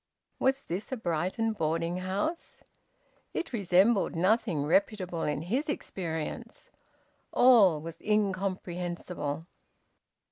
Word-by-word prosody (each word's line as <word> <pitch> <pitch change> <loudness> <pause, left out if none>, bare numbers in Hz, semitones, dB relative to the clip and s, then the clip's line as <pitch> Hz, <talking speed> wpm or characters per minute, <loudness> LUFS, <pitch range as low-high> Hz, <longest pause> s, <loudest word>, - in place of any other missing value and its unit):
Was 270 +1 +2
this 185 +9 -5
a 260 - -2
Brighton 190 +4 -1
boarding 165 -1 -1
house? 195 - -3 0.7
It 335 - -3
resembled 200 0 +3
nothing 185 -3 +2
reputable 180 0 +1
in 150 0 -1
his 255 - -1
experience. 165 - -5 0.6
All 215 -11 +6
was 165 +2 -9
incomprehensible. 180 -6 -2
185 Hz, 95 wpm, -29 LUFS, 165-215 Hz, 0.7 s, All